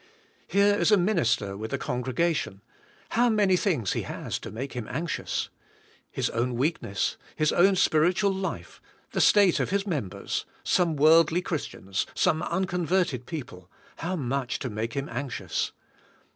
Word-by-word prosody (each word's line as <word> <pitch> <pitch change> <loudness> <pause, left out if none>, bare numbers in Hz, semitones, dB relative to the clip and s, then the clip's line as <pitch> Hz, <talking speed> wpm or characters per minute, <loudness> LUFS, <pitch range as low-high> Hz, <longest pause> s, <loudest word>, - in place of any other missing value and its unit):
Here 200 +1 +4
is 205 - +2
a 210 - +7
minister 150 - +1
with 110 +2 -6
a - - +1
congregation, 125 - -1 0.5
how 240 +1 +3
many 205 -4 +3
things 160 - 0
hehastomake 130 +5 -4
him 120 -4 -5
anxious? 160 +5 -2 0.6
His - - -2
own 120 +2 -1
weakness, 130 - -1 0.2
his 155 -1 +2
own 190 +2 +5
spiritual 180 +4 +3
life, 190 0 -5 0.3
the - - 0
state 200 -4 +5
of - - 0
his 200 +1 0
members, 105 - -3 0.2
some 170 -3 +2
worldly 165 +4 +5
Chris 160 -8 -2
tians, 95 0 -4
some 155 - +2
unconverted 180 -8 0
people 105 - -7
— - - -27
how 180 +3 -2
much 135 -4 -2
to 130 -5 -5
make 110 +2 -3
him 140 +1 -3
anxious? 140 -5 -3
155 Hz, 145 wpm, -27 LUFS, 120-185 Hz, 0.6 s, a